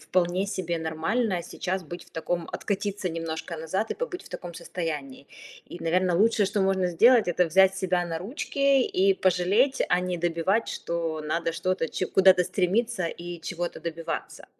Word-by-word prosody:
вполне 180 +1 0
себе 175 -4 -2
нормально 170 +5 -1
сейчас 185 +1 -4
быть 175 +3 -8
в - - -23
таком, 165 +1 -3
откатиться 200 -1 -2
немножко 165 0 -4
назад 175 +7 -2
и - - 0
побыть 480 -7 -5
в - - -13
таком 175 -1 -7
состоянии. 155 -6 -5 0.4
И, - - -7
наверно, 180 +1 +2
лучшее, 220 0 +4
что 200 - -1
можно 190 -1 +2
сделать- 230 +5 +5
это 175 +1 +2
взять 190 +3 +4
себя 185 -2 0
на 165 -1 -3
ручки 275 - +1
и 195 -4 +2
пожалеть, 190 +9 +2
а 180 - +3
не 180 -1 -2
добивать, 175 +6 0
что 165 -2 -3
надо 165 +2 -1
что-то 185 -1 -1
ч 185 - -2
куда-то 190 -1 +5
стремиться 185 +2 0
и 175 0 -7
чего-то 175 -1 -3
добиваться. 165 0 -5
180 Hz, 165 wpm, -26 LUFS, 165-195 Hz, 0.4 s, сделать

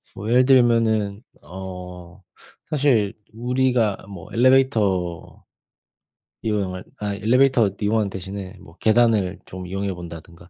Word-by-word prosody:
뭐 105 +2 -5
예를 125 +2 +5
들면은 115 -5 +3 0.2
어 90 +1 -9 0.5
사실 130 -9 +2 0.2
우리가 125 -3 +1
뭐 100 - -10
엘리베이터 110 -9 +1 1.0
이용할 100 -4 -2 0.2
아 105 -1 -3
엘리베이터 120 +1 +3
이용하는 105 0 +1
대신에 95 +1 -7
뭐 80 - -16
계단을 110 -4 +2
좀 90 0 -8
이용해 95 +1 -3
본다든가 85 0 -11
105 Hz, 265 characters per minute, -22 LUFS, 95-120 Hz, 1.0 s, 예를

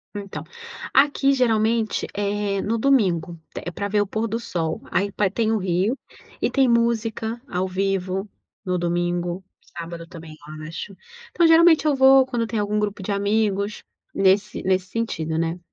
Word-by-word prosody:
Então, 200 -1 -6 0.5
aqui 275 0 +4
geralmente 225 -3 +1
é 205 -1 -1
no 230 +2 -1
domingo, 190 -10 +1 0.2
é 175 - -5
pra 200 +3 -3
ver 205 0 +1
o 205 - -1
pôr 220 +3 -2
do 225 +2 -2
sol, 165 -7 -3
aí 200 +3 0
pa 195 -1 +1
tem 220 +2 0
o 220 - +2
rio, 190 +6 0 0.4
e - - +2
tem 270 -2 +3
música 230 -1 0
ao 185 +1 -1
vivo 195 +1 -1 0.4
no 180 -1 0
domingo, 175 +1 -1 0.3
sábado 170 0 -7
também, 165 -3 -11 0.3
eu 155 - -7
acho. 190 +4 -7 0.4
Então 340 - +3
geralmente 325 -1 +6
eu 295 -2 +3
vou 265 0 +6
quando 240 -3 -2
tem 225 - -3
algum 210 +1 0
grupo 205 -2 -2
de 205 - -3
amigos, 205 0 0 0.3
nesse 195 +2 +2
nesse 185 -1 +1
sentido, 165 -8 -2
né. 165 +2 -1
205 Hz, 165 wpm, -23 LUFS, 185-230 Hz, 0.5 s, geralmente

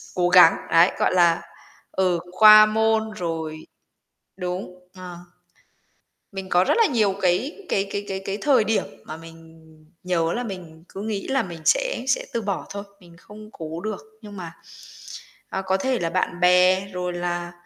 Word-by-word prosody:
cố 175 -1 +1
gắng, 180 -2 +7 0.2
đấy, 170 +3 +5
gọi - - +1
là, 170 -2 +3 0.5
ừ, 180 -2 0
qua 215 +2 +8
môn 220 0 +1
rồi 160 -5 -5 0.7
đúng, 180 0 -5 0.2
ờ. 180 -2 -9 1.1
Mình 190 -1 -7
có 180 +1 +4
rất - - +1
là 455 - +5
nhiều 215 -7 +1
cái 185 - 0
cái 195 0 0
cái 205 0 -4
cái 190 0 -4
cái 195 +1 -3
thời 265 -7 +3
điểm 220 0 0 0.2
mà 155 - -8
mình 165 0 -15 0.4
nhớ 170 -2 0
là 245 - -3
mình 170 -6 -9
cứ 195 - -8
nghĩ 210 -2 -4
là 270 -3 0
mình 170 -3 -9
sẽ - - +1
sẽ 255 - 0
từ 230 - -1
bỏ 200 -2 -3
thôi, 200 0 -6 0.2
mình 170 -2 -18
không 215 +3 -14
cố 160 +1 -7
được 215 -1 -5 0.2
nhưng 205 -2 -11
mà, 170 -2 -8 1.0
à, 190 - -3
có 190 0 0
thể 255 +3 -1
là 165 - -1
bạn 180 0 -2
bè, 180 +2 +4
rồi 180 0 -3
là, 175 0 -3
185 Hz, 175 wpm, -23 LUFS, 175-215 Hz, 1.1 s, qua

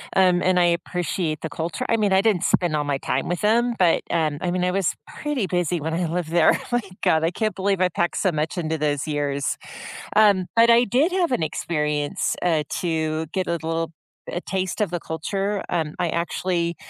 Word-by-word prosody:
um, 180 -2 +4
and 185 -1 +3
I 175 - +5
appreciate 170 -2 -1
the 160 - -4
culture. 165 +11 -4
I 230 - +3
mean, 205 -2 +1
I 190 0 +5
didn't 210 -5 +2
spend 175 -4 +2
all 150 -1 0
my 140 -1 0
time 135 0 -2
with 175 +2 -2
'em, 235 +3 +3
but, 175 -3 +3
um, 155 -3 0
I 180 - -1
mean, 180 0 0
I 180 - +2
was 195 -2 0
pretty 295 -8 -3
busy 175 -2 0
when 160 +2 -3
I 175 0 0
lived 170 0 -2
there. 170 -2 +4
My 240 - +2 0.2
god, 160 0 +3
I 165 - +3
can't 215 +1 -2
believe 195 -1 0
I 185 - +4
packed 170 +1 -1
so 190 - +2
much 155 +2 -2
into 160 -2 -2
those 145 -1 -1
years. 145 -2 -1 0.6
Um, 200 -4 +5
but 230 +1 +6
I 235 +1 +5
did 275 - +2
have 360 -4 +1
an 210 -10 +1
experience, 150 -2 -1
uh, 160 -4 +2 0.2
to 160 -2 -1
get 185 +3 -2
a - - -2
little 165 0 -2 0.4
a 175 - -4
taste 190 +2 -2
of 205 - +1
the 175 - -3
culture. 195 +6 -2
Um, 160 -3 -1
I 175 -2 +1
actually 170 0 -1
175 Hz, 215 wpm, -23 LUFS, 160-195 Hz, 0.6 s, but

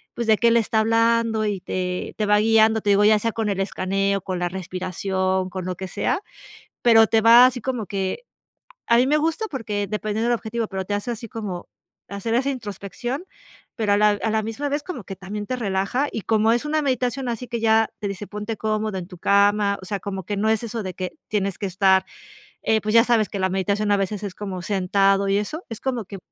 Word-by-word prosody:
pues 235 -1 -3
de 220 -1 +5
que 235 - +4
él 235 - +4
está 220 0 +1
hablando 230 0 +2
y 200 -3 -2
te, 180 -1 -3
te 215 - 0
va 210 0 +4
guiando, 220 0 +4
te 205 - -1
digo 205 +1 +4
ya 215 0 +6
sea 230 +1 -1
con 225 -2 -2
el 195 -1 -1
escaneo, 195 +1 0
con 185 -1 -4
la 175 0 -1
respiración, 185 +1 -2
con 185 0 -5
lo 185 0 -3
que 190 0 -5
sea. 360 - -1 0.6
Pero 225 -2 +6
te 225 -1 +3
va 235 +2 +8
así 250 -2 -3
como 245 -5 -3
que 195 - -3 0.6
a 235 - +4
mí 255 - +4
me 295 - +3
gusta 330 +8 0
porque 210 -6 -3
dependiendo 215 +2 -2
del 240 - +3
objetivo, 225 +1 -3
pero 190 -1 -4
te 205 - -5
hace 205 +4 -3
así 230 0 -7
como 195 -6 -6 0.4
hacer 200 +3 -3
esa 270 +3 +1
introspección, 240 - -5 0.5
pero 215 -3 +1
a - - +3
la, 210 0 +5
a 220 - +1
la 220 0 +1
misma 225 +7 -3
vez 290 +1 -1
como 320 -10 -6
que 195 - -8
también 205 +2 -6
te 255 - -2
relaja, 210 +6 -1
y 220 - -4
como 220 +2 +2
es 240 +3 0
una 310 0 0
meditación 255 -1 -1
así 240 +1 -4
que 235 -1 -3
ya 225 0 +3
te 205 - -2
dice 200 +1 -6
ponte 210 +1 -5
cómodo 215 -2 -1
en 175 - -6
tu 180 - -11
cama. 200 +1 +3
O - - -9
sea, 200 -1 -2
como 190 -1 -5
que 205 +1 -3
no 215 +2 +1
es 220 +1 +1
eso 225 -1 -4
de 185 - -4
que 185 -1 -4 0.2
tienes 200 -3 -1
que - - -5
estar, 190 0 +3 0.6
eh, 220 -1 +2
pues, 215 +2 -2
ya 230 - +7
sabes 230 -4 +2
que 200 - -5
la 190 - +2
meditación 200 +2 0
a - - +4
veces 195 +1 -2
es 190 -2 -5
como 195 -3 -5
sentado 195 +1 +2
y 195 - +2
eso, 305 - -4
es 225 - -6
como 250 -5 -2
que 195 0 -9
210 Hz, 235 wpm, -23 LUFS, 195-230 Hz, 0.6 s, va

